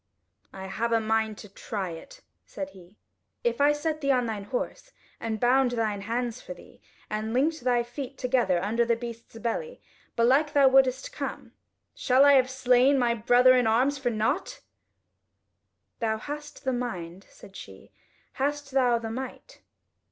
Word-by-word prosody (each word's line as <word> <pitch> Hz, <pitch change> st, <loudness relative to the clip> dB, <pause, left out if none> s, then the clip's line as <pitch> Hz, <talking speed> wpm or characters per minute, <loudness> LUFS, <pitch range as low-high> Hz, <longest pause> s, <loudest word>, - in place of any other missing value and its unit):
"I 190 Hz, -, -8 dB
have 230 Hz, +5 st, -2 dB
a 230 Hz, -, +3 dB
mind 220 Hz, -1 st, 0 dB
to 210 Hz, -, -10 dB
try 195 Hz, -2 st, -5 dB
it," -, -, -11 dB, 0.3 s
said 290 Hz, 0 st, -6 dB
he; 185 Hz, -1 st, -17 dB, 0.5 s
"If 475 Hz, -11 st, 0 dB
I 290 Hz, +1 st, +6 dB
set 310 Hz, +1 st, -2 dB
thee 280 Hz, -, -1 dB
on 250 Hz, -2 st, +2 dB
thine 215 Hz, -3 st, -4 dB
horse 260 Hz, -, -5 dB, 0.3 s
and 220 Hz, -1 st, -3 dB
bound 255 Hz, +2 st, +3 dB
thine 215 Hz, -4 st, -1 dB
hands 235 Hz, +2 st, -3 dB
for 180 Hz, -, -8 dB
thee, -, -, -17 dB, 0.3 s
and 215 Hz, +2 st, -3 dB
linked 310 Hz, +5 st, +1 dB
thy 245 Hz, -1 st, +2 dB
feet 260 Hz, +2 st, -7 dB
together 245 Hz, -8 st, +1 dB
under 225 Hz, +4 st, +1 dB
the 235 Hz, 0 st, +1 dB
beast's 230 Hz, -1 st, -9 dB
belly; 470 Hz, -, -4 dB, 0.4 s
belike 270 Hz, +6 st, +3 dB
thou 280 Hz, -2 st, +6 dB
wouldest 265 Hz, -, +3 dB
come. -, -, -6 dB, 0.4 s
Shall 260 Hz, +2 st, +3 dB
I 285 Hz, -, +7 dB
have 260 Hz, -2 st, +4 dB
slain 260 Hz, +1 st, +3 dB
my 240 Hz, -2 st, +2 dB
brother 245 Hz, +3 st, +5 dB
in 250 Hz, -2 st, +3 dB
arms 260 Hz, +6 st, +2 dB
for 260 Hz, -2 st, 0 dB
nought?" 250 Hz, -, -2 dB, 1.4 s
"Thou 220 Hz, -2 st, 0 dB
hast 295 Hz, +5 st, -8 dB
the 260 Hz, -1 st, 0 dB
mind," 190 Hz, -7 st, -5 dB
said 195 Hz, -, -16 dB
she, -, -, -12 dB, 0.4 s
"hast 285 Hz, +1 st, -2 dB
thou 250 Hz, -3 st, +3 dB
the 225 Hz, -1 st, -5 dB
might?" 265 Hz, -, -8 dB
245 Hz, 165 wpm, -27 LUFS, 225-275 Hz, 1.4 s, I